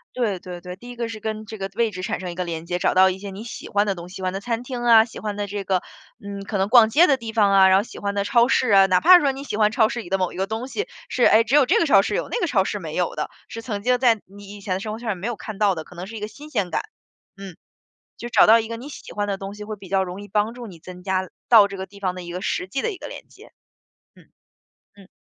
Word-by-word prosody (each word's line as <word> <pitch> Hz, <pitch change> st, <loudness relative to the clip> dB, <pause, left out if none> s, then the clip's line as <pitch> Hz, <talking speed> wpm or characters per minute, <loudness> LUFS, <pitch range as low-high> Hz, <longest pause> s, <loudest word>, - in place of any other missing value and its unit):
对 215 Hz, -7 st, -1 dB
对 175 Hz, -1 st, -9 dB
对， 180 Hz, 0 st, -8 dB
第 240 Hz, +6 st, -13 dB
一 245 Hz, -, -8 dB
个 235 Hz, -1 st, -3 dB
是 220 Hz, -1 st, -7 dB
跟 215 Hz, 0 st, -5 dB
这 220 Hz, +1 st, -8 dB
个 195 Hz, 0 st, -4 dB
位 230 Hz, -1 st, +1 dB
置 185 Hz, -2 st, -7 dB
产 185 Hz, -, -3 dB
生 180 Hz, -2 st, -5 dB
一 -, -, -9 dB
个 180 Hz, -, -2 dB
连 165 Hz, -1 st, -5 dB
接， 175 Hz, 0 st, -2 dB
找 -, -, +1 dB
到 190 Hz, +1 st, +6 dB
一 190 Hz, +1 st, -4 dB
些 200 Hz, 0 st, -7 dB
你 195 Hz, +3 st, -8 dB
喜 235 Hz, -, -8 dB
欢 205 Hz, +1 st, +2 dB
的 200 Hz, -, 0 dB
东 175 Hz, -1 st, -10 dB
西， 185 Hz, -, -12 dB
喜 190 Hz, -, -7 dB
欢 185 Hz, 0 st, -1 dB
的 195 Hz, -, -3 dB
餐 230 Hz, +3 st, -3 dB
厅 250 Hz, -1 st, -5 dB
啊， 225 Hz, -2 st, +7 dB
喜 230 Hz, -, -11 dB
欢 210 Hz, -1 st, -4 dB
的 205 Hz, 0 st, -3 dB
这 200 Hz, 0 st, -5 dB
个， 190 Hz, -2 st, 0 dB, 0.4 s
嗯， 200 Hz, 0 st, -6 dB
可 205 Hz, +1 st, -3 dB
能 195 Hz, +1 st, 0 dB
逛 235 Hz, -2 st, +7 dB
街 320 Hz, +10 st, +6 dB
的 275 Hz, -5 st, +3 dB
地 230 Hz, -2 st, -7 dB
方 210 Hz, -3 st, +3 dB
啊。 195 Hz, -1 st, +6 dB
然 190 Hz, 0 st, +5 dB
后 200 Hz, -, +2 dB
喜 -, -, -11 dB
欢 200 Hz, 0 st, -3 dB
的 200 Hz, -, 0 dB
超 235 Hz, +2 st, +3 dB
市 255 Hz, -2 st, +2 dB
啊， 195 Hz, -1 st, +7 dB
哪 185 Hz, -1 st, +3 dB
怕 365 Hz, +3 st, +8 dB
是 -, -, 0 dB
说 280 Hz, -, +2 dB
你 270 Hz, +1 st, -8 dB
喜 210 Hz, -, -4 dB
欢 215 Hz, -1 st, +3 dB
超 220 Hz, -1 st, +3 dB
市 240 Hz, -, -4 dB
里 215 Hz, -, -8 dB
的 195 Hz, -, +1 dB
某 185 Hz, -2 st, -1 dB
一 -, -, -10 dB
个 190 Hz, +1 st, -1 dB
东 225 Hz, +4 st, -4 dB
西， 425 Hz, -, -4 dB, 0.2 s
是， 250 Hz, -, 0 dB
诶， 220 Hz, +1 st, +6 dB
只 235 Hz, +4 st, -4 dB
有 295 Hz, -2 st, +6 dB
这 -, -, +4 dB
个 335 Hz, -, +2 dB
超 200 Hz, -9 st, +6 dB
市 -, -, -2 dB
有 -, -, -2 dB
那 485 Hz, -, -2 dB
个 355 Hz, -, 0 dB
超 210 Hz, -10 st, +2 dB
市 205 Hz, -, -3 dB
没 160 Hz, -4 st, -7 dB
有 180 Hz, -1 st, -1 dB
的， 150 Hz, -, -3 dB, 0.2 s
是 230 Hz, -, -7 dB
曾 210 Hz, -3 st, -5 dB
经 250 Hz, 0 st, +3 dB
在 235 Hz, -4 st, +4 dB
你 200 Hz, +1 st, -12 dB
以 205 Hz, -, -12 dB
前 185 Hz, -1 st, -2 dB
生 215 Hz, +1 st, -5 dB
活 220 Hz, -, -7 dB
圈 235 Hz, -1 st, -5 dB
儿 205 Hz, -, 0 dB
没 185 Hz, +5 st, -5 dB
有 240 Hz, -, -2 dB
看 215 Hz, -1 st, -8 dB
到 205 Hz, -3 st, +3 dB
的， 160 Hz, -, -5 dB
可 -, -, -16 dB
能 180 Hz, +2 st, -7 dB
是 225 Hz, -, -9 dB
一 -, -, -6 dB
个 210 Hz, -, -4 dB
新 285 Hz, +8 st, -13 dB
鲜 205 Hz, -, -2 dB
感。 -, -, 0 dB, 0.5 s
嗯， 195 Hz, -3 st, -10 dB, 0.6 s
就 240 Hz, -, -6 dB
找 -, -, +5 dB
到 225 Hz, +2 st, +7 dB
一 220 Hz, -, -6 dB
个 230 Hz, -, -5 dB
你 250 Hz, +5 st, -9 dB
喜 -, -, -10 dB
欢 205 Hz, 0 st, -2 dB
的 200 Hz, -1 st, -3 dB
东 195 Hz, +1 st, -7 dB
西， 210 Hz, 0 st, -8 dB
会 215 Hz, 0 st, -6 dB
比 195 Hz, -2 st, -13 dB
较 195 Hz, 0 st, +1 dB
容 180 Hz, +2 st, -7 dB
易 205 Hz, -, -10 dB
帮 210 Hz, +3 st, 0 dB
助 240 Hz, 0 st, -9 dB
你 185 Hz, -6 st, -12 dB
增 180 Hz, +2 st, -11 dB
加 190 Hz, -1 st, -2 dB, 0.2 s
到 220 Hz, -4 st, +8 dB
这 200 Hz, -, -7 dB
个 190 Hz, -, -5 dB
地 200 Hz, -, -16 dB
方 185 Hz, -2 st, -1 dB
的 185 Hz, -, -7 dB
一 175 Hz, -, -8 dB
个 180 Hz, +1 st, -5 dB
实 180 Hz, -, -2 dB
际 265 Hz, +8 st, -3 dB
的 -, -, 0 dB
一 375 Hz, -, -10 dB
个 -, -, -8 dB
连 -, -, -10 dB
接。 -, -, -17 dB, 0.6 s
嗯， -, -, -20 dB, 0.7 s
嗯。 195 Hz, -2 st, -17 dB
205 Hz, 360 characters per minute, -23 LUFS, 190-230 Hz, 0.7 s, 怕